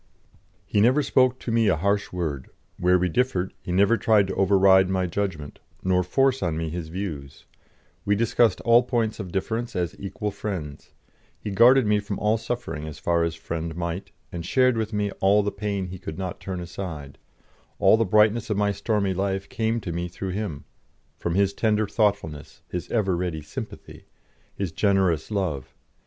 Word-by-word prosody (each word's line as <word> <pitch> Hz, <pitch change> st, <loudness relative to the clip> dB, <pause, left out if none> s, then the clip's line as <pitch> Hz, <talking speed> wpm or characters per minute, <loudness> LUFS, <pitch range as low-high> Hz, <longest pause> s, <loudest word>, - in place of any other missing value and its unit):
He 100 Hz, -, +1 dB
never 130 Hz, +7 st, +4 dB
spoke 130 Hz, -2 st, +3 dB
to 120 Hz, -, -5 dB
me 115 Hz, -1 st, +3 dB
a 95 Hz, -, +4 dB
harsh 100 Hz, +5 st, 0 dB
word; 80 Hz, -7 st, -4 dB, 0.3 s
where 90 Hz, +1 st, +4 dB
we 90 Hz, 0 st, +1 dB
differed, 95 Hz, -2 st, 0 dB
he -, -, -6 dB
never 100 Hz, +5 st, +4 dB
tried 110 Hz, -3 st, +4 dB
to -, -, -2 dB
override 95 Hz, -1 st, +5 dB
my 95 Hz, -1 st, 0 dB
judgment, 85 Hz, -5 st, -4 dB, 0.2 s
nor 90 Hz, -1 st, +2 dB
force 135 Hz, +8 st, +1 dB
on 80 Hz, -3 st, -1 dB
me 80 Hz, -1 st, -2 dB
his 85 Hz, -1 st, -5 dB
views; 80 Hz, -6 st, -6 dB, 0.6 s
we 105 Hz, -, +2 dB
discussed 115 Hz, -1 st, +2 dB
all 120 Hz, 0 st, +6 dB
points 115 Hz, -3 st, -1 dB
of 95 Hz, -4 st, -6 dB
difference 110 Hz, +5 st, -2 dB
as 85 Hz, -3 st, -2 dB
equal 105 Hz, +1 st, -4 dB
friends; 85 Hz, -10 st, -6 dB, 0.5 s
he 105 Hz, -, -5 dB
guarded 120 Hz, +5 st, +6 dB
me 105 Hz, 0 st, +3 dB
from 100 Hz, -1 st, -4 dB
all 110 Hz, +1 st, +1 dB
suffering 110 Hz, -11 st, -4 dB
as 75 Hz, -1 st, -8 dB
far 85 Hz, +1 st, +1 dB
as 85 Hz, -1 st, -1 dB
friend 80 Hz, 0 st, -5 dB
might, 85 Hz, +2 st, -4 dB, 0.2 s
and 85 Hz, -1 st, -5 dB
shared 130 Hz, +6 st, +3 dB
with 110 Hz, -1 st, -2 dB
me 105 Hz, -1 st, -1 dB
all 100 Hz, +2 st, +4 dB
the 100 Hz, -, -1 dB
pain 100 Hz, -2 st, -3 dB
he 95 Hz, 0 st, -8 dB
could 80 Hz, -, -7 dB
not 95 Hz, -2 st, -4 dB
turn 95 Hz, -2 st, -5 dB
aside; 85 Hz, -5 st, -7 dB, 0.6 s
all -, -, +5 dB
the 115 Hz, -, +2 dB
brightness 105 Hz, +2 st, +3 dB
of 105 Hz, -, 0 dB
my 105 Hz, 0 st, +2 dB
stormy 100 Hz, -1 st, 0 dB
life 95 Hz, +1 st, -2 dB
came 115 Hz, +1 st, -1 dB
to 95 Hz, -5 st, -5 dB
me 85 Hz, +1 st, -3 dB
through 95 Hz, +2 st, -6 dB
him, 95 Hz, -7 st, -4 dB, 0.5 s
from 85 Hz, -, -3 dB
his 100 Hz, 0 st, +2 dB
tender 110 Hz, -1 st, +1 dB
thoughtfulness, 100 Hz, -9 st, -1 dB
his 90 Hz, -, -5 dB
ever 100 Hz, -6 st, +1 dB
ready 85 Hz, -3 st, -3 dB
sympathy, 75 Hz, -, -9 dB, 0.5 s
his 95 Hz, -4 st, -3 dB
generous 95 Hz, -3 st, +1 dB
love. 80 Hz, -11 st, -3 dB
95 Hz, 180 wpm, -25 LUFS, 85-105 Hz, 0.6 s, all